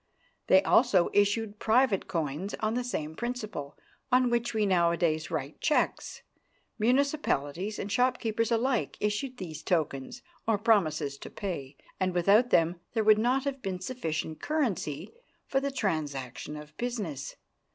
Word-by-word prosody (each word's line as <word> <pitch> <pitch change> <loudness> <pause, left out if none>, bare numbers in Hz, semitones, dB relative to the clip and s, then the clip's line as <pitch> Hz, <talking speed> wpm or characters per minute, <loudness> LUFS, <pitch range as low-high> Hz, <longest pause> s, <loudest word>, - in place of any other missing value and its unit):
They 190 +1 +6
also 195 -3 +4
issued 205 +1 +1
private 225 -3 +3
coins 165 +3 -2
on 215 0 0
the 250 +1 -1
same 160 -10 -4
principle 220 - -5 0.3
on 250 -1 +4
which 240 0 +1
we 215 -2 +1
nowadays 170 -4 +2
write 150 -2 -4
cheques. 300 - 0 0.6
Municipalities 215 - +1
and 200 - -4
shopkeepers 230 -2 +1
alike 240 +1 +1
issued 230 +5 -1
these 160 -6 -6
tokens, 160 - -2 0.2
or 225 -2 +3
promises 160 - +1
to - - -8
pay, 150 -9 -5 0.2
and 185 -1 0
without 200 +8 +4
them 170 -2 +3
there 225 -2 +1
would 215 0 +6
not 255 +4 +2
have 275 -2 -3
been 190 -4 -3
sufficient 160 -8 -4
currency 195 - -2 0.3
for 270 - +1
the 280 +1 -1
transaction 150 - -3
of 150 0 -11
business. 210 - -4
205 Hz, 140 wpm, -29 LUFS, 160-240 Hz, 0.6 s, They